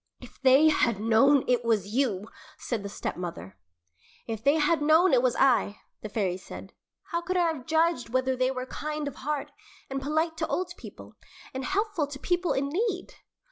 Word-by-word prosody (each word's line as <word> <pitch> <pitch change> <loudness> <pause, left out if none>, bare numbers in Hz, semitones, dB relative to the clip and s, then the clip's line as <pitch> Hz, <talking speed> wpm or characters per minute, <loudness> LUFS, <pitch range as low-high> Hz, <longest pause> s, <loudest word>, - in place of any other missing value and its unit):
"If - - -15
they 270 +4 +6
had 235 -8 +1
known 240 +6 +4
it 245 -1 +2
was 215 -3 0
you 225 -6 0 0.2
" - - -21
said 235 -4 -1
the 200 - -6
stepmother. 170 - -6 0.7
"If 225 -2 -5
they 280 +2 +4
had 310 +1 +2
known 320 +4 +4
it 250 - +5
was 250 -2 +1
I," 240 -6 +2 0.2
the 215 - -6
fairy 195 -4 -1
said, 185 - -11 0.4
"how 340 -1 0
could 365 +2 -2
I 350 - +3
have 260 -5 -10
judged 320 -6 +1
whether 260 +2 0
they 255 0 +1
were 255 -1 -4
kind 300 +2 -4
of 285 - -7
heart, 295 +1 -3 0.4
and 270 0 -2
polite 315 +3 -1
to 320 - -1
old 360 -1 -2
people, - - -12 0.4
and 265 0 -4
helpful 390 -4 -1
to 285 -1 -8
people 355 +4 0
in 275 +1 -1
need?" 375 +3 -2
270 Hz, 190 wpm, -27 LUFS, 235-320 Hz, 0.7 s, they